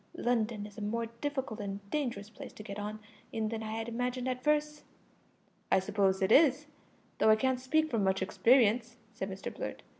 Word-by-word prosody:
London 225 -3 0
is 210 +1 -10
a - - -7
more 230 +3 -1
difficult 240 0 -4
and 200 -1 -4
dangerous 235 -8 -2
place - - -9
to 215 - -10
get 200 0 -6
on 210 +1 -4 0.3
in 220 -1 -1
than 225 0 -4
I 220 0 -4
had 225 +1 -3
imagined 245 +2 -2
at 255 -1 -2
first." 300 0 +1 0.9
"I - - +6
suppose 190 0 +1
it 190 - +2
is, 290 0 +6 0.5
though - - +5
I 215 - +8
can't 260 +3 +1
speak 310 +5 +1
from 225 -4 +1
much 190 0 +1
experience," 235 +2 +3 0.2
said 195 -3 -4
Mr 190 0 -6
Blurt. - - -5
225 Hz, 190 wpm, -31 LUFS, 205-255 Hz, 0.9 s, I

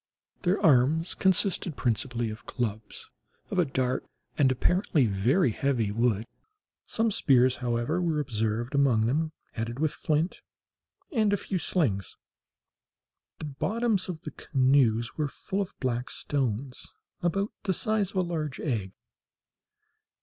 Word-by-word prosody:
Their 185 +2 +2
arms 155 +4 +4
consisted 190 -3 +2
principally 120 0 0
of 110 - -10
clubs, 110 -4 -4 0.4
of 185 - 0
a 175 - +4
dark, 130 -2 -1 0.3
and 135 -3 +4
apparently 160 +1 +2
very 115 - +2
heavy 120 -4 0
wood. 115 -1 +1 0.6
Some 225 0 +1
spears, 130 -7 +4
however, 120 +7 -1
were 165 -3 0
observed 115 -2 -1
among 130 -6 +3
them, 155 +6 0 0.2
headed 115 +1 -4
with 155 +1 0
flint, 155 +3 -1 0.7
and 220 -7 +2
a 205 - +3
few 190 -1 -3
slings. 125 - -1 1.2
The - - -6
bottoms 205 - 0
of 165 -3 -5
the - - -7
canoes 130 -4 +2
were 150 -2 0
full 190 +7 -3
of 195 - -6
black 125 -1 -1
stones 130 -2 -3 0.3
about 195 +4 0
the 195 - 0
size 210 +1 +1
of 200 - -6
a - - +4
large 155 -6 -3
egg. 105 -10 -2
135 Hz, 135 wpm, -28 LUFS, 120-175 Hz, 1.2 s, arms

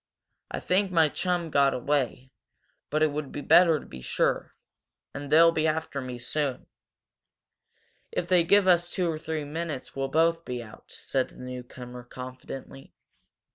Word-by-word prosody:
"I - - -4
think 190 +2 +1
my 165 -3 +4
chum 175 0 -1
got 140 -1 +4
away, 130 -1 -1 0.6
but 155 +1 +1
it 155 - +3
would 145 -1 -4
be 145 - -5
better 165 0 +6
to - - -12
be 65 - -10
sure. - - -1 0.6
And 145 -1 -7
they'll 165 +2 +7
be 160 -1 +1
after 155 -3 -2
me 125 -1 -6
soon." 130 +2 -2 1.5
"If 175 - -2
they 180 -2 +4
give 200 +3 +4
us 175 -1 +4
two 180 -1 -1
or 155 - -5
three 160 -1 -3
minutes 155 -2 -5
we'll 135 0 -1
both 165 +3 +2
get 125 -4 -5
out," 110 - -14
said 130 -2 -2
the - - -18
newcomer, 125 -1 -8
confidently. 130 +2 -9
150 Hz, 160 wpm, -27 LUFS, 130-165 Hz, 1.5 s, they'll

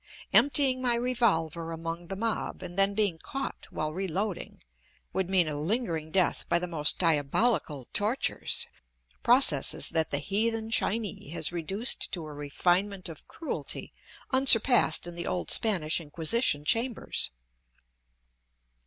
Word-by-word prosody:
Emptying 275 -2 +3
my 245 -2 +1
revolver 195 -10 -1
among 165 +1 -6
the 195 - -5
mob, 220 -2 -3
and 175 -1 -8
then 195 +1 +2
being 200 -6 0
caught 275 +9 -6
while 155 0 -4
reloading, 190 +2 -4 0.5
would 190 0 -2
mean 185 -4 +2
a 150 - -3
lingering 165 -1 -2
death 185 +2 +1
by 170 - +3
the 175 - -2
most 160 -4 +2
diabolical 150 - 0
tortures, 215 +6 -1 0.6
processes 235 - +5
that 160 -1 0
the 145 - -1
heathen 220 +7 -2
Chinee 215 -8 -2
has 160 0 -2
reduced 190 +8 +1
to 170 -5 -5
a 155 - -9
refinement 175 +7 -1
of 160 - -12
cruelty 325 - -6 0.4
unsurpassed 250 - +6
in 175 - -7
the 170 0 -6
old 90 -3 -2
Spanish 175 -7 +1
inquisition 155 - 0
chambers. 235 +5 -1
180 Hz, 130 wpm, -28 LUFS, 160-225 Hz, 0.6 s, unsurpassed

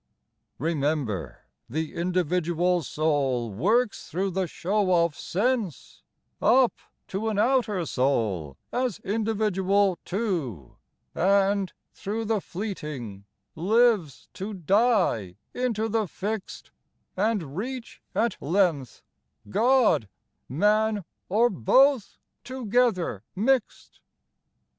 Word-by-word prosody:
Remember 140 - -2 0.3
the 155 +5 -3
individual 175 0 +1
soul 140 -6 0
works 215 - +1
through 190 +4 -1
the 185 0 -1
show 185 0 +2
of 165 -4 -4
sense 210 - -2 0.4
Up 255 0 +5 0.3
to 210 +4 -2
an 215 - -2
outer 215 -5 +2
soul 110 - 0 0.2
as 250 -4 0
individual, 200 -3 +1
too; 165 - -3 0.4
And, 195 +1 +2 0.2
through 220 +3 -4
the 215 -2 0
fleeting, 150 - -6 0.3
lives 205 - +2
to 200 +2 -5
die 185 - +2 0.2
into 230 -3 -1
the 220 -1 0
fixed 205 +3 -5 0.4
And 190 -8 -1
reach 245 +5 -5
at 230 +1 0
length 160 - 0 0.5
God, 240 - +3 0.4
man, 210 +5 +2 0.2
or 220 +6 +4
both, 255 - +3 0.3
to 255 -1 -6
gether 205 - +1
mixed." 245 +4 0
190 Hz, 95 wpm, -26 LUFS, 155-220 Hz, 0.5 s, Up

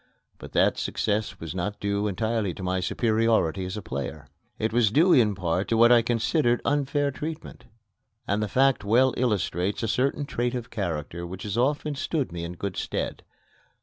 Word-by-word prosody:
But - - -11
that - - +3
success 105 +1 -1
was 80 0 -6
not 100 +3 -3
due 100 +1 0
entirely 110 -1 -1
to 95 - -8
my 95 0 0
superiority 110 -3 +1
as 95 +3 -5
a 105 - -6
player. 70 +1 -5 0.3
It 110 0 -1
was 120 -3 +4
due 165 - +4
in 110 -5 +4
part 90 +1 -1
to 115 - +1
what 120 +1 +6
I 120 -1 +7
considered 120 +2 +1
unfair 145 0 +1
treatment; 155 +3 -7 0.6
and 100 +2 0
the 105 - 0
fact 135 +4 +2
well 125 +6 +4
illustrates 100 -4 0
a - - 0
certain 135 +5 0
trait 120 -2 -2
of 125 0 -5
character 85 -4 -4
which 95 +2 -8
has 105 -1 -3
often 145 +4 +1
stood 140 - -2
me 85 0 -5
in 85 +1 -5
good 95 +1 -5
stead. - - -3
110 Hz, 180 wpm, -26 LUFS, 95-125 Hz, 0.6 s, I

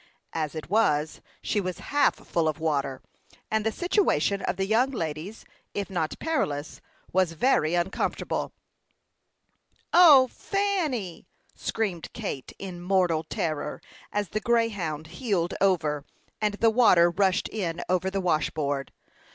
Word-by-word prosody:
As 155 -1 -2
it 155 - -6
was, 155 -7 +1 0.2
she 210 - 0
was 185 -2 -4 0.2
half 290 0 +4
full 165 -2 -1
of 155 - -1
water, 140 -4 -1 0.5
and 220 0 +1
the 220 - +1
situation 345 - +1
of 180 - -1
the 195 - 0
young 225 +6 +3
ladies, 170 - -5 0.3
if 200 -1 -3
not 165 -4 -2
perilous, 150 - -2 0.3
was 185 -2 +2
very 165 - +2
uncomfortable. 175 +2 -1 1.4
"O, 300 -7 +8
Fanny!" 315 - -2 0.3
screamed 190 -8 -3
Kate, 130 - -5
in 180 -3 -7
mortal 180 -3 +2
terror, 155 -2 -3 0.3
as 205 -3 -1
the 215 - -1
Greyhound 205 -10 0
heeled 175 0 -1
over, 155 -7 +2 0.4
and 210 -1 +1
the 225 +2 +3
water 185 -8 +5
rushed 190 +1 +1
in 175 -6 -3
over 185 +1 +1
the 195 0 -2
washboard. 150 -5 -1
185 Hz, 130 wpm, -27 LUFS, 160-220 Hz, 1.4 s, O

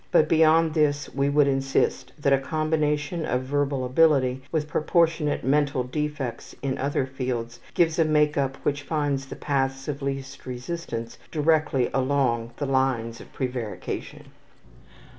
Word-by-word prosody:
But 155 - +5
beyond 160 0 +4
this 145 -3 +1
we 140 +1 +1
would 145 0 +4
insist 135 -1 0
that 140 -2 +2
a 135 - +4
combination 155 +2 -1
of 125 -3 -1
verbal 140 -1 0
ability 130 -2 +3
with 155 -2 0
proportionate 160 -1 +1
mental 140 -1 +2
defects 140 -2 -4
in 135 -1 -1
other 140 0 0
fields 125 -3 -4 0.2
gives 165 0 +2
a - - +6
make 150 -1 +2
up 135 -1 0
which 145 0 0
finds 145 -3 -1
the - - -7
paths 135 -2 -1
of 145 -1 -3
least 135 -1 -5
resistance 125 -2 -5
directly 155 -5 +2
along 130 -4 +1
the 145 - -2
lines 130 -4 0
of - - -14
prevarication. 125 -5 -5
140 Hz, 140 wpm, -25 LUFS, 130-150 Hz, 0.2 s, a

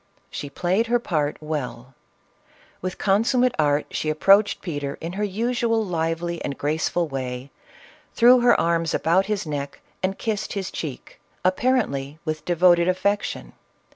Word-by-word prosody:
She 145 - -5
played 185 +10 0
her 240 +1 +3
part 155 -10 -1
well; 135 -4 -5 0.9
with 185 0 -4
consummate 235 +5 +2
art 145 -1 +2
she 155 - -2
approached 195 +7 +4
Peter 145 -5 -4
in 165 +2 -5
her 205 +2 -2
usual 230 +2 0
lively 170 -1 -2
and 140 - -4
graceful 160 +3 0
way, 130 -1 -5 0.6
threw 245 +2 +7
her 240 0 +4
arms 165 -1 +1
about 185 +4 +2
his 210 -4 -1
neck 145 -2 -5 0.2
and 190 +1 -1
kissed 215 -2 -3
his 195 -2 -4
cheek, 145 -6 -7 0.2
apparently 185 - +1
with 155 -1 -3
devoted 175 0 +4
affection. 200 +3 -1
175 Hz, 140 wpm, -23 LUFS, 150-205 Hz, 0.9 s, threw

